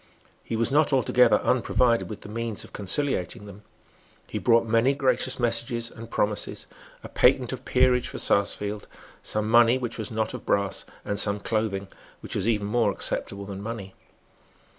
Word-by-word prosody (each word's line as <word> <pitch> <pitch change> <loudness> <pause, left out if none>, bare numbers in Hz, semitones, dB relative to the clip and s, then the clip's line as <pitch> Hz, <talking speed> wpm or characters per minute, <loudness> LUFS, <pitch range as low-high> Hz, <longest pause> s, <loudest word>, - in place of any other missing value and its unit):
He 115 - -4
was 115 +3 0
not 150 +2 +3
altogether 125 -1 +4
unprovided 125 -1 +2
with 105 -1 -7
the - - -10
means 115 0 -4
of - - -15
conciliating 105 - -1
them. 100 0 -11 0.6
He - - -5
brought 115 -1 +4
many 115 +4 +2
gracious 130 -1 +1
messages 115 0 -1
and 115 0 -10
promises, 105 -1 -1 0.4
a - - -6
patent - - +3
of - - -8
peerage 125 -1 +3
for - - -6
Sarsfield, 100 +1 0 0.3
some 110 0 -2
money 120 +2 +5
which 120 -2 -5
was 110 - -4
not 110 -1 -2
of - - -7
brass, 100 -1 0 0.2
and 100 0 -2
some 100 0 0
clothing, 105 -2 -2 0.3
which - - -7
was 100 - -1
even 105 -3 +1
more 110 0 +2
acceptable 100 0 -2
than 100 0 -7
money. 100 -3 -6
115 Hz, 165 wpm, -26 LUFS, 105-120 Hz, 0.6 s, money